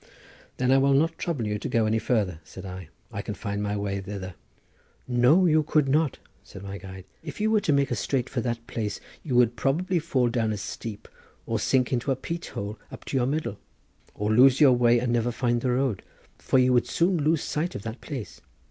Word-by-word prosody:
"Then 125 0 +2
I 135 - +6
will 135 0 +4
not 165 +3 +1
trouble 145 -10 -2
you 105 0 -2
to - - -4
go 115 -1 +2
any 110 +1 +1
further," 100 -9 0
said 80 - -11
I; 90 -3 -8 0.2
"I - - -4
can - - -5
find 100 0 -4
my 105 0 -1
way 100 -1 -2
thither." 95 -1 -6 0.7
"No, 125 +9 +4
you 155 -2 +4
could 150 -1 +1
not," 150 +1 +2 0.3
said 95 - -11
my 100 0 -6
guide; 95 -1 -10 0.2
"if 150 +1 -8
you 215 +1 +1
were 220 - +4
to 160 - +1
make 140 -1 +2
straight 130 -3 -1
for 125 - -2
that 115 -1 -3
place 110 -5 -4 0.2
you 130 -5 -3
would 120 -1 +4
perhaps 170 +4 0
fall 130 -7 +1
down 115 -2 0
a - - -4
steep, 105 +1 -7 0.4
or - - -1
sink 130 -1 +1
into 125 +2 -1
a - - +2
peat 170 +6 -5
hole 105 +2 -6
up - - -10
to 135 - -2
your 125 -1 +2
middle, 140 -8 -2 0.6
or 105 +1 -1
lose 130 +3 +6
your 140 -4 +7
way 120 -1 +4
and 120 0 0
never 120 0 +1
find 120 0 0
the 130 - 0
road, 125 -4 0 0.4
for - - +1
you 125 0 +4
would 120 - +3
soon 175 +2 +2
lose 155 +1 +1
sight 170 +4 -2
of 100 - -6
that 110 +2 -6
place. 120 - -7
125 Hz, 220 wpm, -26 LUFS, 105-140 Hz, 0.7 s, your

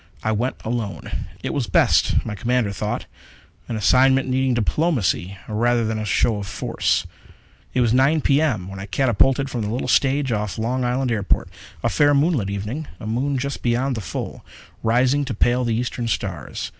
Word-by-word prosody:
I 110 - +1
went 120 +4 -1
alone; 115 -3 -3 0.3
it - - -2
was - - -1
best, - - +3
my 110 - -3
commander 115 0 0
thought. 105 +2 -3 0.6
An 115 - -3
assignment 130 +5 +4
needing 130 -1 +1
diplomacy 115 - 0
rather 115 +2 +1
than 110 0 -2
a 110 - -3
show 110 +1 +2
of 100 -1 -5
force. - - 0 0.7
It 130 - +3
was 120 -2 +3
9 135 +5 +4
P. 140 +1 +3
M. 110 - 0
when 95 0 -8
I 100 - -6
catapulted 135 +2 +2
from 125 -3 -3
the 105 - -2
little 120 +4 -2
stage 135 +1 +2
of 105 -2 -2
Long 125 +3 -1
Island 125 +1 0
airport. 105 -4 0 0.3
A - - +2
fair, 145 0 +4
moonlit 140 - +2
evening 105 +10 -4
a 115 - -8
moon 130 +6 -1
just 140 +2 -3
beyond 125 +3 +1
the 110 - -3
full, 85 - -6 0.4
rising 125 +5 +2
to 130 -4 -4
pale 120 +4 +2
the 115 -2 0
eastern 120 0 -2
stars. 90 - -3
120 Hz, 180 wpm, -22 LUFS, 110-130 Hz, 0.7 s, assignment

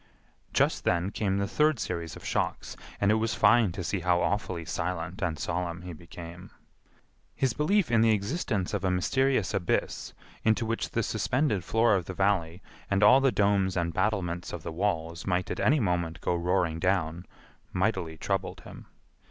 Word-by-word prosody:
Just - - +1
then 90 +3 +1
came 100 -3 -1
the 100 0 0
third 150 +2 +2
series 85 -5 -4
of - - -12
shocks, - - -2 0.2
and 100 0 +3
it 110 0 +2
was 115 0 0
fine 115 -2 +5
to 90 - -5
see 100 +3 -1
how 90 0 +2
awfully 90 -4 -1
silent 90 0 -3
and 80 -3 -1
solemn 90 +1 -3
he 90 -1 -7
became. 85 +2 -10 0.9
His 130 -3 +1
belief 170 - +1
in 115 -1 +4
the 115 - +5
existence 105 - -1
of 100 -2 -2
a 95 - +2
mysterious 110 +5 +1
abyss, 95 -4 -1 0.3
into 110 +1 +2
which 115 +1 -2
the 115 - -1
suspended 110 - 0
floor 115 +4 +3
of 95 -4 +1
the 95 - -6
Valley 95 -3 0 0.3
and 100 +1 +2
all 130 +6 +7
the 135 -1 +3
domes 100 -3 +2
and 85 -1 -1
battlements 95 -3 -1
of - - -6
the - - -5
walls 85 -2 -2
might 90 0 0
at - - -3
any 150 +3 +3
moment 90 -5 -1
go - - -1
roaring 85 -1 0
down, 90 -1 0 0.4
mightily 90 -4 -1
troubled 95 0 -2
him. - - -12
95 Hz, 175 wpm, -28 LUFS, 85-110 Hz, 0.9 s, all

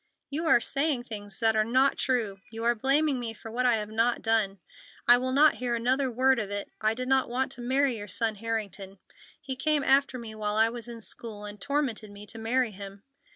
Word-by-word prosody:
"You 320 +4 -2
are 315 - +6
saying 275 0 0
things 205 -4 -6
that 225 -1 +3
are 215 - +4
not 260 +5 +3
true! 225 -7 -1
You 225 0 -7
are 235 +1 +4
blaming 270 +4 +1
me 230 -2 -4
for 225 - -10
what 250 +2 +1
I 240 - +4
have 210 -1 -4
not 230 +2 +1
done. 220 -3 +1 0.5
I 245 0 +8
will 255 +1 -1
not 295 +4 +6
hear 245 -1 0
another 255 +3 +1
word 260 +1 +3
of 210 -3 -3
it. 205 0 -4
I 215 +1 +1
did 255 +1 -4
not 265 -1 +2
want 255 +2 -1
to 245 - -9
marry 260 0 +1
your 205 - -7
son 220 +3 +1
Harrington. 205 -3 -4 0.4
He 270 -2 -3
came 295 +2 +1
after 270 -1 +3
me 230 -3 -8
while 210 -1 -2
I 220 +1 +4
was 235 0 -7
in 235 -1 -8
school 215 -1 -6
and 205 0 -9
tormented 280 -7 -2
me 205 +1 -11
to 225 +2 -8
marry 240 +1 +1
him. 200 0 -10
235 Hz, 225 wpm, -28 LUFS, 215-260 Hz, 0.5 s, I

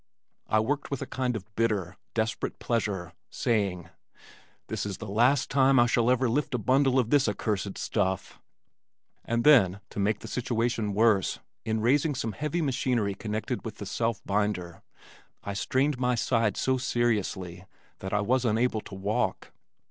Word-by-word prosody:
I 110 - +3
worked 140 +6 -1
with 140 - -3
a - - -5
kind 125 -2 -2
of 100 -4 -5
bitter, 105 -6 0 0.2
desperate 110 0 -1
pleasure, 100 -7 -2 0.2
saying, 100 -7 -1 0.8
"This - - -3
is 100 -2 -4
the 110 - -7
last 120 +7 +2
time 135 0 +5
I 120 - +6
shall 120 0 +2
ever 130 0 +3
lift 130 +2 0
a - - +2
bundle 130 +4 +3
of 120 -3 +1
this 135 -5 +4
accursed 100 -1 -2
stuff." 95 -3 -2 0.8
And 115 0 -1
then, 100 -11 +6
to - - -5
make 105 +2 +1
the - - -8
situation 115 -4 -1
worse, 110 -3 +3 0.3
in 110 -1 0
raising 140 +5 +2
some 115 -2 -2
heavy 150 +7 -2
machinery 125 -6 0
connected 110 +4 -4
with 110 -2 -7
the 100 - -6
self 115 +2 -2
binder, 100 -4 -1 0.6
I 100 - -4
strained 130 +7 0
my 125 -1 +2
side 115 -2 +1
so 130 0 +1
seriously 105 -8 -1 0.3
that 95 - -5
I 105 - +1
was 125 +4 +1
unable 115 -1 +1
to 100 - -10
walk. 100 +3 -2
115 Hz, 165 wpm, -28 LUFS, 100-125 Hz, 0.8 s, I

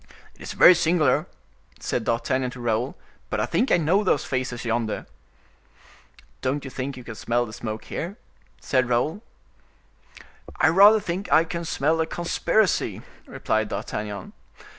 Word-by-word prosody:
"It - - -22
is - - -6
very 180 - +8
singular," 170 -2 +2 0.5
said 115 - -2
D'Artagnan 125 +2 0
to 125 - -10
Raoul, 120 +2 -1 0.3
"but - - -2
I - - +1
think 255 - 0
I - - +6
know 175 +6 +2
those 165 -7 +1
faces 130 -2 -3
yonder." 115 -1 -1 1.4
"Don't 140 +2 -2
you 135 - -7
think 130 +1 -5
you 125 - -9
can 120 - -8
smell 120 +2 -1
the 110 - -10
smoke 110 0 -6
here?" 185 +6 -5 0.4
said 130 -2 0
Raoul. 150 - 0 1.3
"I - - +4
rather 200 +6 +7
think 185 +1 -4
I 160 - +6
can 170 +1 -5
smell 160 +1 +1
a 160 - -1
conspiracy," 175 +4 0 0.2
replied - - -1
D'Artagnan. 105 -2 -5
135 Hz, 150 wpm, -24 LUFS, 120-170 Hz, 1.4 s, very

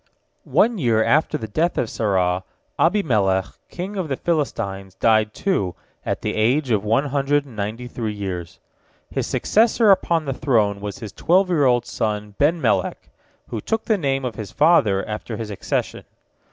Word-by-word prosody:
One 230 -2 +3
year 115 -6 +2
after 155 +4 +2
the 110 - -6
death 165 +11 0
of 120 - +1
Sarah, 95 -4 0 0.4
Abimelech 105 - +2 0.2
king 190 +4 -6
of 185 -4 -2
the 135 - -1
Philistines 100 - -2
died, 110 0 +3
too, 110 - -1 0.3
at - - -3
the - - -1
age 125 +5 +1
of 105 -2 +2
one 115 +7 +2
hundred 140 +1 +1
and 130 -5 -13
ninety 110 +4 -4
three 110 -3 -4
years. 95 -4 -5 0.5
His - - -2
successor 220 -1 +3
upon 170 -4 +2
the 135 - -2
throne 105 -7 +1
was 100 -1 -5
his 110 -4 -8
twelve 185 - +2
year 155 -6 +3
old 120 -2 +3
son 105 -1 -3
Benmelek, 160 +4 +1 0.4
who - - -4
took 225 0 -2
the 220 - +3
name 135 -3 0
of 120 -4 -4
his 110 -3 -6
father 115 - +3
after 110 +1 -5
his 110 -2 -5
accession. 100 - -3
120 Hz, 165 wpm, -22 LUFS, 105-155 Hz, 0.5 s, One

